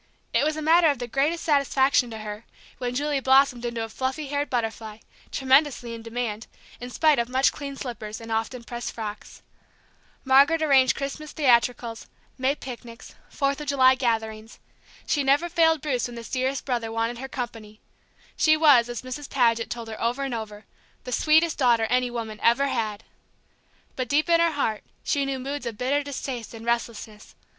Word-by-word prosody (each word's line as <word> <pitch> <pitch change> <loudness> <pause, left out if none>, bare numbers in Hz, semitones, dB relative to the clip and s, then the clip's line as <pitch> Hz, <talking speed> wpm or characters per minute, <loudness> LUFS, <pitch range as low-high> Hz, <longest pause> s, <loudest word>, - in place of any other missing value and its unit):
It - - +3
was 310 +1 0
a 310 - -4
matter 330 +2 +5
of 285 - 0
the 245 - -4
greatest 285 +7 0
satisfaction 280 -4 +2
to 225 - -7
her 210 0 -7 0.4
when 245 -1 -3
Julie 290 +1 0
blossomed 265 -2 +3
into 235 -1 -3
a 225 - -6
fluffy 265 +5 -3
haired 290 +1 -1
butterfly, 225 -3 -3 0.3
tremendously 265 -3 +2
in 230 - -7
demand, 230 -1 -4 0.3
in 245 - -7
spite 305 +1 +3
of 235 0 -1
much 260 +1 +3
cleaned 280 -1 -7
slippers 220 -4 -6
and 225 0 -9
often 225 +2 -2
pressed 240 +1 -6
frocks. 215 -2 -8 0.8
Margaret 280 +5 +5
arranged 270 -4 +4
Christmas 295 +2 -5
theatricals, 235 -4 +1 0.3
May 265 +2 +1
picnics, 240 -3 -10 0.2
Fourth 275 0 -1
of 300 - -7
July 260 -2 +5
gatherings. 225 -3 -2 0.5
She 290 - +1
never 280 +5 +3
failed 325 -3 +3
Bruce 255 -6 -1
when 240 - -10
this 230 -1 -8
dearest 265 +1 -1
brother 235 -4 -2
wanted 230 +1 -2
her 265 - -5
company; 225 -5 -7 0.6
she 310 0 +4
was, 280 -7 +5
as 240 -1 -5
Mrs. 260 +3 -7
Paget 230 -3 +2
told 235 -1 -5
her 220 -1 -8
over 245 +4 0
and 270 -2 -3
over, 215 -2 -6 0.4
"the 250 - -7
sweetest 315 +5 +3
daughter 240 -4 +4
any 250 0 +2
woman 225 -2 -5
ever 275 +4 +3
had." 220 -4 -2 0.9
But 255 -2 -3
deep 305 +4 +2
in 335 0 +5
her 335 -1 +3
heart 225 -7 -1 0.2
she 280 -1 0
knew 270 -1 -2
moods 275 0 -5
of 225 -3 -5
bitter 275 +5 +1
distaste 260 -5 -6
and 225 0 -10
restlessness. 230 -2 -4
250 Hz, 180 wpm, -25 LUFS, 230-280 Hz, 0.9 s, matter